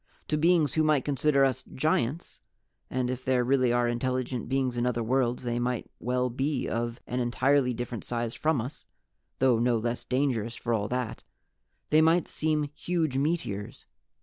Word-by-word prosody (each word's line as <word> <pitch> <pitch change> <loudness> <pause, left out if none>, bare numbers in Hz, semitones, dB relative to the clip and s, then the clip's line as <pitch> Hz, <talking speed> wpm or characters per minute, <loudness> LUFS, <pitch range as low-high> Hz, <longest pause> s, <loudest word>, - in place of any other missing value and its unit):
To 155 - +2
beings 160 -2 +3
who 160 - +2
might 150 -3 +2
consider 140 0 +3
us 130 -3 -1
giants 145 +1 -1 0.5
and 130 -1 -1
if 130 0 -4
there 130 -1 +2
really 130 -1 +3
are 120 0 +2
intelligent 125 0 -2
beings 130 -2 0
in 120 +1 0
other 120 -1 0
worlds 125 +1 0
they 120 -1 -1
might 120 -1 -2
well 125 +1 0
be 135 +3 -1
of 120 +1 -2
an 125 - -3
entirely 125 +2 +2
different 120 -2 -5
size 120 -1 -3
from 155 -5 +1
us, 125 +6 -8 0.5
though 125 -3 +3
no 120 0 +2
less 120 +2 -2
dangerous 125 -4 0
for 120 - -2
all 105 -2 0
that 125 -2 -3 0.7
they 155 +1 +6
might 165 +2 +3
seem 155 -1 0
huge 160 -2 -1
meteors. 135 - -2
125 Hz, 170 wpm, -28 LUFS, 120-140 Hz, 0.7 s, they